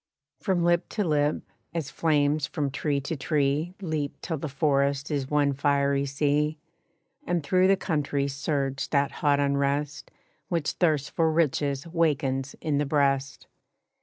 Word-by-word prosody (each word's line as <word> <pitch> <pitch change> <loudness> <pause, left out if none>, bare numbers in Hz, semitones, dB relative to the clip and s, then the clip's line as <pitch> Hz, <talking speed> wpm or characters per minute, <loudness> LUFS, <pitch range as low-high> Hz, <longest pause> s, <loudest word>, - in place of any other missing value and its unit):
From 180 -3 0
lip 175 0 +2
to 210 - -1
lip, 150 -3 +1 0.3
as 150 -5 -3
flames 150 -1 +1
from 145 -2 -2
tree 145 0 -1
to 140 +4 -3
tree 150 +4 0
Leap 155 -4 -3
till 160 -4 -3
the 155 - -4
forest 140 0 +1
is 140 -2 -2
one 145 -1 +2
fiery 140 0 +1
sea, 150 +2 0 0.7
And 175 -3 0
through 185 +5 +3
the 195 0 +4
country 145 -5 -1
surged 140 -1 -2
that 140 -1 +2
hot 145 -1 +3
unrest 140 +1 0 0.4
Which 165 -4 0
thirst 155 -5 +1
for 160 -1 +2
riches 145 -2 0
wakens 145 -5 0
in 145 -2 0
the 145 - +1
breast. 140 -1 0
145 Hz, 145 wpm, -26 LUFS, 140-155 Hz, 0.7 s, the